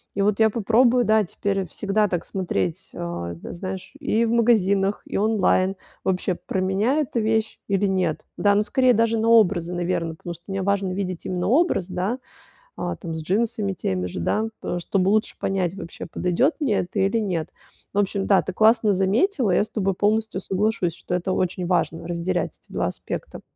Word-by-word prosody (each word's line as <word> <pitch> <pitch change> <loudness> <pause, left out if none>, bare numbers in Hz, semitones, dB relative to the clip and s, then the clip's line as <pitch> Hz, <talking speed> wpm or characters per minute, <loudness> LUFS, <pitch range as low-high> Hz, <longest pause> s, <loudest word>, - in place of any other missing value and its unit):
И 200 - 0
вот 205 +1 +1
я 220 0 +6
попробую, 235 +3 +3
да, 215 0 +4
теперь 195 0 -2
всегда 210 +5 0
так 175 -3 -2
смотреть, 100 - -2
а, 85 0 -4
да, 85 - -9
знаешь, 185 +1 -6
и 235 -6 +1
в 225 - 0
магазинах, 205 -4 +2
и - - -3
онлайн: 195 -2 +2 0.3
вообще, 185 0 0
про 190 - -4
меня 195 +8 +1
эта 250 -4 -2
вещь 220 0 0
или 200 0 +1
нет. 185 -5 -1
Да, 205 -1 +3
ну, 210 - +3
скорее, 255 +2 +3
даже 230 +1 +2
на 225 - +1
образы, 185 -6 +4
наверно, 170 -2 -1
потому 175 +2 -7
что 170 +1 -15
мне 195 -1 -2
важно 200 -1 0
видеть 185 -2 -4
именно 180 0 -1
образ, 280 - +3
да, 185 +6 -2 0.6
а, - - -3
там, 165 -3 -6
с 160 - -4
джинсами 200 +2 0
теми 90 - -2
же, 90 0 -5
да, 215 - 0
пэ 175 - -3
чтобы 185 +2 +1
лучше 215 +1 +1
понять, 190 -2 -1
вообще, 170 -4 -8
подойдет 180 - +1
мне 240 -9 +1
это 175 - -3
или 195 +4 +2
нет. 180 -7 -2 0.4
В - - 0
общем, 200 0 +1
да, 195 -1 +4
ты - - -5
классно 220 0 +4
заметила, 210 - +2
я 180 - +4
с - - -12
тобой 195 -3 0
полностью 215 0 0
соглашусь, 195 -2 0
что 175 - -5
это 180 +1 -1
очень 180 -1 -1
важно- 170 -2 0
разделять 175 +1 -2
эти - - -20
два - - 0
аспекта. - - -6
195 Hz, 190 wpm, -23 LUFS, 180-220 Hz, 0.6 s, я